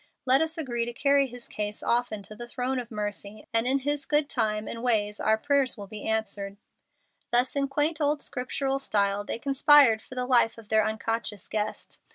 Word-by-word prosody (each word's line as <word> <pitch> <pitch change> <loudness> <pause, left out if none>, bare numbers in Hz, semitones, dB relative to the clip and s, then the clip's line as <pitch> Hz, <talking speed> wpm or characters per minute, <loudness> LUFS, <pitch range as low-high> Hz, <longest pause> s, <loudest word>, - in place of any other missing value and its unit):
"Let 265 +2 +5
us 320 0 -2
agree 240 -7 -1
to 240 - -5
carry 280 +2 +3
his 245 -1 -10
case 210 0 -5
often 235 -4 0
to 215 - -11
the 240 +2 -8
throne 255 +2 -2
of 240 - -7
mercy, 210 -1 -5
and 230 +1 +2
in 265 +2 +3
His 285 +1 -2
good 295 -1 +2
time 215 -3 0
and 230 - -5
way 215 -4 +1
our 220 0 +2
prayers 275 +1 +1
will 205 - -7
be 210 +1 -7
answered." 205 -2 -2 0.7
Thus 245 +3 +2
in 280 -1 +1
quaint 295 +3 0
old 295 0 +2
scriptural 270 +1 -2
style 200 -5 0
they - - -3
conspired 275 -3 +5
for 255 - -12
the 250 0 -2
life 240 -3 +3
of 225 -2 -13
their 220 0 +4
unconscious 220 -2 -3
guest. 215 0 -4
240 Hz, 200 wpm, -27 LUFS, 215-275 Hz, 0.7 s, Let